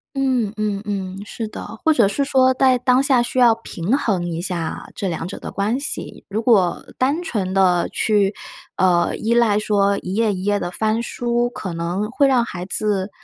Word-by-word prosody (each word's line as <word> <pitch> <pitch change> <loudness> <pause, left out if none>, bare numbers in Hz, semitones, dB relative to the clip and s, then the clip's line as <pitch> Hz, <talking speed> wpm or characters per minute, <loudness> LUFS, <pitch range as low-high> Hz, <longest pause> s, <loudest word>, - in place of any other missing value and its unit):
嗯， 255 -6 0
嗯， 210 -1 -2
嗯， 195 -1 -4
是 225 +1 -5
的。 - - -8 0.2
或 320 - +5
者 230 -9 +4
是 280 +7 0
说 260 -1 +3
在 260 -1 +3
当 250 +1 +3
下 265 -3 +3
需 240 - -3
要 240 -3 +6
平 225 +1 -2
衡 200 -11 -1
一 165 -1 -3
下 175 -3 -4
这 195 - -3
两 165 0 -4
者 195 - -7
的 - - -7
关 210 +5 0
系， 290 +2 -4
如 215 +3 -2
果 200 -7 +2
单 285 +7 +1
纯 205 - -2
地 185 -2 +3
去， 205 -2 +1 0.4
呃， 175 -2 +2
依 230 +2 0
赖 225 -3 +3
说 200 -1 +1
一 185 - -5
页 220 -1 +2
一 185 0 -5
页 205 0 +1
地 175 - -4
翻 220 +4 0
书， 240 0 -1
可 190 -7 -6
能 180 +6 -2
会 280 +3 +3
让 255 -3 +3
孩 180 -5 -6
子 200 0 -1
210 Hz, 215 characters per minute, -20 LUFS, 190-245 Hz, 0.4 s, 要